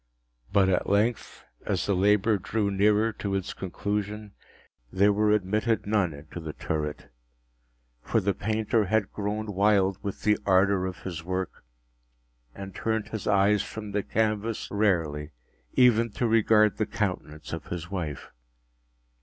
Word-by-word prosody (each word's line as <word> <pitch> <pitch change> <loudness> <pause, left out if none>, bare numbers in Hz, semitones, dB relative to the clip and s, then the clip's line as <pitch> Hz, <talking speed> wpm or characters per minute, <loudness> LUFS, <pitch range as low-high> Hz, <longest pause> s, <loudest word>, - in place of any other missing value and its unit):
But 100 -2 +4
at 90 -2 +1
length, 105 +4 0 0.2
as - - -1
the 100 - +1
labor 105 +2 +3
drew 100 +2 -1
nearer 105 +3 +3
to 100 -2 -3
its 95 -2 -3
conclusion, 105 +2 -4 0.6
there 100 +2 +4
were 105 +1 +2
admitted 105 +2 +1
none 100 -4 +1
into 75 +4 -9
the 80 -2 -6
turret; 75 -4 -4 0.9
for 115 - +1
the 100 -1 0
painter 110 +2 0
had 105 +1 0
grown 105 +1 -3
wild 100 -1 +2
with 100 -2 -5
the 105 -1 +3
ardor 95 0 +3
of 95 - -8
his 85 -4 -5
work, 90 +1 -4 0.9
and 95 -1 -8
turned 110 -1 -2
his 110 -4 -5
eyes 100 0 +4
from 105 0 -7
canvas 110 +1 -1
merely, 80 -8 0 0.4
even 115 -2 +4
to 125 - -1
regard 110 -2 +4
the - - 0
countenance 75 +2 -4
of 80 - -6
his 85 0 -6
wife. 80 -7 -5
100 Hz, 140 wpm, -27 LUFS, 95-105 Hz, 0.9 s, But